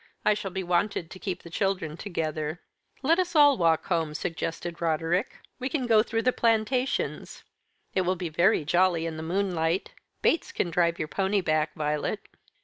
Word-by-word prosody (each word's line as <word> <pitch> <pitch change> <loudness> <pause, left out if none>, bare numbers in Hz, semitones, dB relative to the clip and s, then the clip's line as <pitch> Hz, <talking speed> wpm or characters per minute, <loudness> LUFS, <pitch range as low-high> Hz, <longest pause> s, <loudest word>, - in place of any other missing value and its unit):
"I 210 - +5
shall 205 -2 -4
be 190 +1 -4
wanted 175 0 0
to 190 - -9
keep 185 -2 -4
the 170 - -11
children 180 -5 -1
together." 160 -3 -3 0.4
"Let 330 +6 +3
us 355 -2 -1
all 290 -2 +7
walk 165 -3 +2
home," 165 -4 -1
suggested 170 +1 -4
Roderick. 165 +5 0 0.2
"We 255 +1 -2
can 270 -3 -1
go 225 -3 +5
through 225 0 -1
the 255 - +3
plantations. 235 +3 0 0.5
It 190 - +2
will 185 +1 +1
be 180 -1 -4
very 170 +1 +3
jolly 175 0 +2
in 165 -1 -3
the - - -5
moonlight. 175 0 -1 0.3
Bates 330 - +2
can 175 - -1
drive 170 -1 +2
your 155 - -3
pony 195 +4 0
back, 155 -2 0
Violet." 150 -1 -2
180 Hz, 175 wpm, -27 LUFS, 165-210 Hz, 0.5 s, all